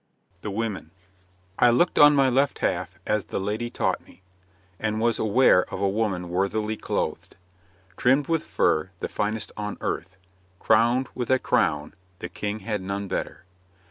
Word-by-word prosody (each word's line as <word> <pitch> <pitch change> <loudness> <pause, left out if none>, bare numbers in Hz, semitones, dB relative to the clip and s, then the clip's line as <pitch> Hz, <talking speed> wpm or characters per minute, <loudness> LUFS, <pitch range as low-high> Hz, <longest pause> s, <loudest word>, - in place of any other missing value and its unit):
THE - - -4
WOMEN 105 -4 -3 0.7
'I 120 - +6
looked 160 +9 +2
on 145 0 +8
my 135 -1 +4
left 135 +2 +2
half 90 +2 -2
as 105 -2 0
the - - -4
lady 105 +5 -2
taught - - -1
me, 95 - -20 0.6
And 110 0 -1
was 115 0 +1
aware 110 -4 +4
of - - -4
a 100 - +1
woman 95 -4 -1
worthily 105 +4 -1
clothed, - - -3 0.6
Trimmed 135 +3 +3
with 165 -1 0
fur, 80 +4 +1
the - - -4
finest 105 +1 -2
on 105 0 -4
earth, 95 +3 -4 0.4
Crowned 120 +6 +3
with 125 -2 -4
a 130 - +5
crown, 75 - 0 0.2
the - - -6
King 105 +1 -4
had 105 0 -3
none 100 +1 -4
better. 95 - -4
105 Hz, 160 wpm, -25 LUFS, 95-120 Hz, 0.7 s, on